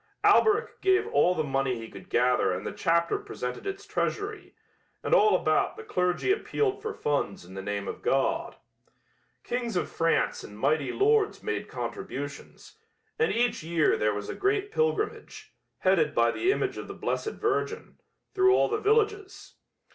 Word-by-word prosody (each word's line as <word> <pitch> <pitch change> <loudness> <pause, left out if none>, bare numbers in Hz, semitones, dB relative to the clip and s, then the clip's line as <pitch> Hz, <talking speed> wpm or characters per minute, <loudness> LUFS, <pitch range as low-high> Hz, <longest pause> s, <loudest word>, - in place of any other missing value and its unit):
"Alberic 440 +2 +3
gave 380 -1 +3
all 175 +6 +3
the 155 - 0
money 135 -3 0
he 115 0 -7
could - - -13
gather 125 -5 +2
and 90 +1 -4
the - - -3
chapter 170 - +1
presented 410 -1 -6
its 395 +1 -5
treasury, 415 +1 -3 0.5
and - - 0
all 430 -3 +6
about - - +1
the 445 - -8
clergy 180 - 0
appealed 405 0 0
for 440 0 -3
funds 145 - -2
in 95 - -13
the 95 - -5
name 100 0 -3
of - - -6
God. 325 - 0 0.9
Kings 240 -3 -3
of 180 - -1
France 165 0 +1
and 105 - -11
mighty 145 +5 +1
lords 420 +1 +2
made 440 - -3
contributions, - - -7 0.4
and 460 - +3
each 240 +1 +1
year 160 -1 +2
there 105 -1 0
was 105 0 -5
a - - -4
great 405 +1 0
pilgrimage, 460 -2 -2 0.2
headed 165 -6 +2
by 115 0 +4
the 370 - +1
image - - -1
of - - -7
the - - -8
Blessed 435 - -2
Virgin, 425 +1 -2 0.3
through 380 -1 +5
all - - +3
the 440 - 0
villages. 420 -2 0
355 Hz, 165 wpm, -27 LUFS, -, 0.9 s, all